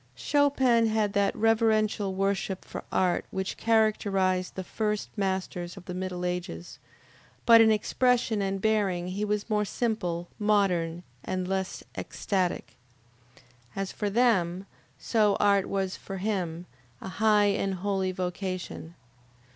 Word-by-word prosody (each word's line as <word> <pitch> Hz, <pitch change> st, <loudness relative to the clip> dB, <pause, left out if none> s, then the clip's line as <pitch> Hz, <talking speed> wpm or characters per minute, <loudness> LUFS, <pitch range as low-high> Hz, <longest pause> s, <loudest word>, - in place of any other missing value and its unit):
Chopin 260 Hz, -, +3 dB
had 215 Hz, -2 st, 0 dB
that 200 Hz, 0 st, +1 dB
reverential 215 Hz, -3 st, +2 dB
worship 195 Hz, -1 st, -1 dB
for -, -, -7 dB
art 180 Hz, -2 st, +1 dB
which 190 Hz, 0 st, -3 dB
characterized 200 Hz, -5 st, +1 dB
the 190 Hz, -, -4 dB
first 210 Hz, +2 st, -2 dB
masters 190 Hz, -3 st, -3 dB
of -, -, -11 dB
the 180 Hz, -, -6 dB
middle 180 Hz, -1 st, -4 dB
ages, 180 Hz, -, -5 dB, 0.7 s
but 230 Hz, -1 st, +8 dB
in 225 Hz, -, +6 dB
expression 235 Hz, 0 st, +1 dB
and 195 Hz, 0 st, -1 dB
bearing 195 Hz, -5 st, +1 dB
he 195 Hz, +3 st, -3 dB
was 210 Hz, 0 st, -1 dB
more 210 Hz, -2 st, +1 dB
simple, 185 Hz, -6 st, -2 dB
modern, 180 Hz, -5 st, +1 dB, 0.2 s
and 185 Hz, -1 st, -3 dB
less 190 Hz, 0 st, -3 dB
ecstatic. 180 Hz, -, -2 dB, 1.0 s
As 195 Hz, -1 st, -3 dB
for 210 Hz, -, -2 dB
them, 195 Hz, -5 st, +2 dB, 0.3 s
so 210 Hz, -3 st, +2 dB
art 200 Hz, -2 st, +3 dB
was 190 Hz, -1 st, -2 dB
for 195 Hz, -, -7 dB
him, 180 Hz, -4 st, -2 dB, 0.3 s
a -, -, -8 dB
high 210 Hz, 0 st, +3 dB
and 195 Hz, -1 st, -1 dB
holy 190 Hz, 0 st, -1 dB
vocation. 180 Hz, -2 st, -5 dB
195 Hz, 130 wpm, -28 LUFS, 185-215 Hz, 1.0 s, but